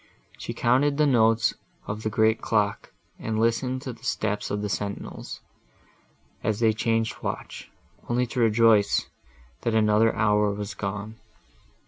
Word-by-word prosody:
She - - -6
counted 140 +4 +2
the 150 - +4
notes 115 -4 +3 0.3
of 105 +1 -5
the 110 - -1
great 110 +1 +2
clock, - - 0 0.3
and 110 -1 -2
listened 125 +3 0
to 130 -4 -5
the 115 - -19
steps 105 -1 -2
of 105 0 -2
the - - -1
sentinels, 100 0 -5 1.0
as 110 -1 0
they 110 -2 +3
changed 115 0 0
the - - -10
watch, - - -6 0.4
only 125 +1 +1
to 125 +1 -5
rejoice, 115 -2 +4 0.6
that 115 -2 0
another 110 +1 +3
hour 105 -1 +2
was 105 +1 -5
gone. 100 +2 -5
110 Hz, 145 wpm, -25 LUFS, 105-115 Hz, 1.0 s, the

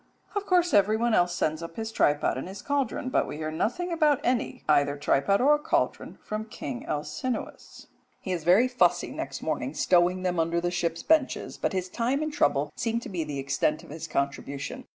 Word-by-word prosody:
Of 410 -1 -3
course 355 -2 +3
everyone 215 +4 +3
else 175 -3 +3
sends 155 -1 -1
up 165 0 -7
his 220 0 -4
tripod 145 -8 +2
and 130 - -5
his 195 +1 -9
cauldron, 275 -3 -1
but - - +1
we - - -6
hear 155 0 -3
nothing 350 - -1
about 305 -4 +3
any, 255 +1 -1
either 145 -1 +3
tripod 145 - +2
or 295 +3 +5
cauldron, 295 - -1
from 215 +1 -4
King 140 - -6
Alcinous. 155 - -4 0.3
He 190 - -5
is 175 -3 -2
very 185 +9 +5
fussy 250 -1 +2
next - - -5
morning - - -2
stowing 180 +1 +3
them 180 -2 0
under 165 +1 +1
the 175 +1 -1
ship's 170 -2 -2
benches, 315 -4 +1
but - - -1
his 185 -1 -1
time 245 +9 -1
and 310 -1 -3
trouble 145 - +1
seem 230 -1 -1
to - - -8
be 175 -4 -2
the 150 -2 -5
extent 140 +2 0
of - - -13
his 160 +1 -6
contribution. 140 -1 -3
185 Hz, 195 wpm, -27 LUFS, 155-250 Hz, 0.3 s, or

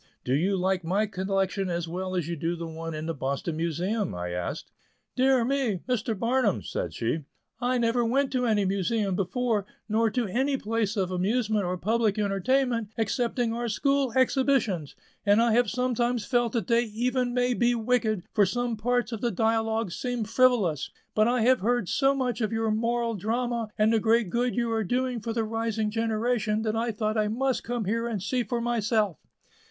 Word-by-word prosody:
"Do 125 - -1
you 185 +8 +2
like 185 0 0
my 195 +6 +1
collection 195 -1 -1
as 170 -1 -2
well 185 +2 -4
as 175 -4 -1
you 170 - -2
do 165 +2 -2
the 170 0 -5
one 165 0 -6
in 155 +1 -4
the 165 - -2
Boston 140 +3 -3
Museum?" 175 - -1
I 90 0 -4
asked. 90 0 -4 0.4
"Dear 260 -2 +3
me! 250 -8 0
Mr. 230 -3 -1
Barnum," 235 -1 +1
said - - -3
she, 120 +7 -1 0.4
"I 250 +1 +1
never 235 0 +2
went 265 +4 +1
to 250 -2 0
any 210 -3 +2
Museum 195 +1 0
before, 205 +2 0 0.2
nor 225 +1 +2
to 245 +2 -1
any 265 +7 0
place 220 -2 -1
of 185 -2 0
amusement 210 +2 0
or 180 +1 -2
public 220 +2 +1
entertainment, 230 +4 +1
excepting 235 +1 0
our 240 +1 -2
school 275 +3 +1
exhibitions; 260 - +1 0.3
and 205 +1 +4
I 235 0 +4
have 235 0 +3
sometimes 245 -2 0
felt 240 -3 +1
that 230 -6 0
they 235 +3 +3
even 245 +3 -1
may 250 0 +1
be 240 0 +2
wicked, 225 -4 0
for 210 - +4
some 245 +2 -1
parts 245 +3 0
of 225 - -4
the 240 - +1
dialogues 225 -2 0
seemed 245 -4 -3
frivolous; 220 - +2 0.2
but 215 +1 +3
I 245 0 +2
have 255 +3 +4
heard 240 0 0
so 275 +5 +2
much 250 -4 -1
of 215 - 0
your 225 -1 0
'moral 230 +1 0
drama' 230 +2 -2
and 215 +1 +3
the 225 - +4
great 225 -3 +2
good 245 +1 0
you 235 -1 0
are 225 -1 0
doing 250 +4 -1
for 225 +2 -4
the 225 0 0
rising 220 -1 -1
generation 220 -1 0
that 220 -1 -1
I 230 +1 0
thought 215 +1 -1
I 210 - +2
must 255 +4 0
come 240 -2 -3
here 230 +4 0
and 225 -4 -2
see 245 +7 -1
for 240 0 -2
myself." 220 -5 0
225 Hz, 190 wpm, -27 LUFS, 200-245 Hz, 0.4 s, and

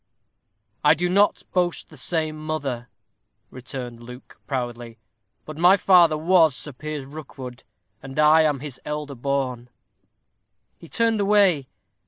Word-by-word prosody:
"I 150 - +6
do 180 +3 -1
not 200 +3 +2
boast 180 -2 0
the - - -13
same 155 +2 -2
mother," 135 -6 -4 0.6
returned 125 -2 -8
Luke, 125 +2 -13
proudly, 120 -4 -4 0.5
"but 155 0 -9
my 180 +3 +6
father 175 -5 +5
was 165 -3 +4
Sir 150 - -3
Piers 150 +1 -6
Rookwood, 135 -4 -10 0.4
and 135 0 -10
I 155 +1 +6
am 150 -4 +1
his 140 -3 -8
elder 150 -1 -5
born." 130 -2 -3 1.1
He 165 - -14
turned 230 -2 +1
away. 195 -9 +3
150 Hz, 130 wpm, -23 LUFS, 130-165 Hz, 1.1 s, I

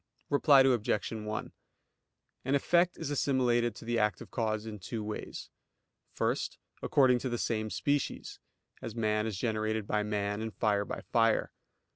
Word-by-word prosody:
Reply 140 -1 +6
Obj. 120 -6 +2
1: 110 -1 -4 0.9
An 135 +2 +1
effect 175 +5 +2
is 155 -3 -4
assimilated 120 -5 +1
to - - -11
the 120 0 0
active 105 0 -1
cause 110 -2 -1
in 105 -2 -7
two 105 +4 -5
ways. 105 0 -6 0.6
First, - - -1 0.2
according 130 -3 +4
to 130 - -3
the 120 - -1
same 110 -2 -1
species; 145 +5 -2 0.4
as 115 - -6
man 110 -1 +1
is 105 -4 -3
generated 110 0 -1
by 105 +1 0
man, 105 0 -2
and 110 -1 -5
fire 100 -2 +1
by - - -5
fire. 115 -1 +3
110 Hz, 150 wpm, -31 LUFS, 105-125 Hz, 0.9 s, Reply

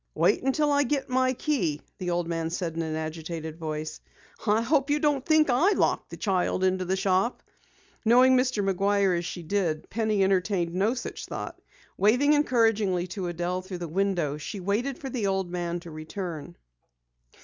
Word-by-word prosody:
"Wait - - +3
until 290 +3 +1
I 285 0 +4
get 275 0 -1
my 255 0 +2
key," 250 - -1 0.2
the 180 - -3
old 175 -1 0
man 165 -1 -2
said 170 -1 -3
in 165 - -1
an 160 -1 -3
agitated 160 0 -5
voice. 155 -1 -5 0.5
"I 210 +2 +4
hope 280 +2 +2
you 290 - +3
don't 290 -3 +1
think 310 0 +4
I 340 +12 +4
locked - - 0
the - - -8
child 185 -2 0
into 185 0 +1
the 185 +2 0
shop!" 190 +5 +1 0.6
Knowing 250 +3 +6
Mr. 250 -6 +1
McGuire 195 0 +2
as 170 0 -2
she 175 0 -5
did, 165 -3 -1
Penny 215 -2 +1
entertained 185 -2 +1
no 200 +7 +1
such 240 - -6
thought. - - -6 0.4
Waving 250 +9 +4
encouragingly 225 -10 +2
to 185 -1 -4
Adelle 175 +1 -2
through 185 0 -7
the 175 -1 -5
window, 175 -4 0
she 195 +7 -6
waited 215 +8 -1
for 270 -2 -7
the 230 -5 -1
old 190 -2 -1
man 175 -1 -2
to 170 -2 -10
return. 155 - -6
190 Hz, 180 wpm, -27 LUFS, 175-245 Hz, 0.6 s, Knowing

